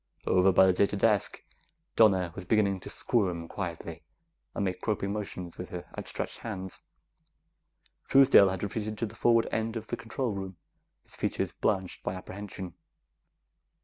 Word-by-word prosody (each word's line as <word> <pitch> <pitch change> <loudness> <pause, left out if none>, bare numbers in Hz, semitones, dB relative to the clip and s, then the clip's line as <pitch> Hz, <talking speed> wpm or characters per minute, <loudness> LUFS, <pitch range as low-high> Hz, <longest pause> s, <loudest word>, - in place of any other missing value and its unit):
Over 95 +1 +4
by 95 +1 +6
the 95 - +4
data 100 +2 +2
desk, 105 -1 +1 0.5
Donna 95 -6 +4
was 90 - -7
beginning 100 0 +2
to - - -9
squirm 90 -8 0
quietly 85 -4 -5 0.5
and 100 - 0
make 90 -1 -3
groping 100 -2 -1
motions 90 -5 -5
with 90 - -6
her 90 -1 -6
outstretched - - -4
hands. 95 -5 -6 1.3
Truesdale 135 -7 +7
had 95 0 -3
retreated 105 +1 -3
to 115 - -1
the 105 - -9
forward 115 -1 +3
end 110 +1 -1
of 110 -1 -4
the - - -4
control 115 +2 -3
room, 95 -2 -6 0.5
his - - -7
features - - -2
blanched 95 -3 -1
by - - -3
apprehension. 95 -1 -7
100 Hz, 150 wpm, -29 LUFS, 90-110 Hz, 1.3 s, Truesdale